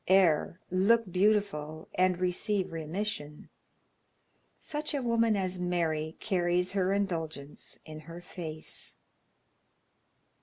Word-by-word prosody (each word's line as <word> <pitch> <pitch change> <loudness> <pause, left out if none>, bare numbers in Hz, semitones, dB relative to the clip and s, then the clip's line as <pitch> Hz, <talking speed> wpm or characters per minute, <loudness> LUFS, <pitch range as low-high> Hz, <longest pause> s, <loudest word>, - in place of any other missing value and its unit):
Err, 180 -2 +4
look 200 +3 +3
beautiful, 185 -6 +1
and 185 -1 +3
receive 185 +1 0
remission! 160 -1 -4 1.1
Such 300 0 -4
a 280 - 0
woman 230 -2 +3
as 185 -1 -1
Mary 165 -3 0
carries 180 -3 +1
her 190 -1 +2
indulgence 165 -7 -3
in 155 -1 -8
her 165 +2 -9
face. 165 -3 -5
180 Hz, 100 wpm, -30 LUFS, 160-200 Hz, 1.1 s, Err